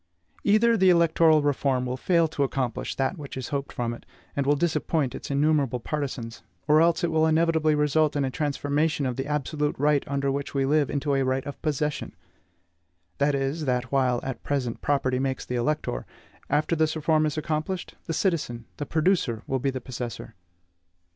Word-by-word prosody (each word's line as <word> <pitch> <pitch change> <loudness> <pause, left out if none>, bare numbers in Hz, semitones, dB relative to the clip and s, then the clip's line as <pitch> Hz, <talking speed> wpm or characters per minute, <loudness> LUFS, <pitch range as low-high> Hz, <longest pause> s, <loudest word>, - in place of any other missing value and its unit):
Either 225 +3 +4
the 190 -3 +4
electoral 165 -3 +4
reform 135 -3 +1
will 125 0 -2
fail 170 +4 +2
to 155 -2 -4
accomplish 130 -3 -1
that 135 +6 -1
which 140 -2 -7
is 130 - -5
hoped 140 -2 -3
from 120 -1 -2
it, 120 - -10 0.3
and 140 -1 -1
will 145 - +4
disappoint 155 -3 0
its - - -7
innumerable 140 -3 +2
partisans, 130 -4 -4 0.3
or 155 +1 +6
else 170 +1 +3
it 170 - +1
will 160 0 +3
inevitably 160 -1 +3
result 150 +1 +2
in 140 -1 +1
a 130 - -2
transformation 145 +1 0
of 125 -1 -1
the 135 +2 -3
absolute 150 0 -1
right 145 0 +2
under 140 0 0
which 140 +1 -4
we 135 -1 +2
live 145 0 +2
into 145 0 -1
a 135 - +2
right 130 0 0
of 140 - -7
possession; 150 -1 -2 1.0
that 140 0 +2
is, 140 +3 -2
that 125 -1 -1
while, 130 -3 +2
at 130 -1 -5
present, 130 -5 -2
property 130 -3 +1
makes 135 -1 -2
the - - -5
elector, 120 - -1 0.4
after 155 +3 +1
this 160 0 +1
reform 155 0 +2
is 150 - -4
accomplished, 155 +4 -3
the - - -2
citizen, 150 - -1
the 145 - -4
producer 155 - +1
will 130 - -1
be 135 - 0
the 130 -1 -3
possessor. 120 -2 -6
145 Hz, 185 wpm, -26 LUFS, 130-155 Hz, 1.0 s, or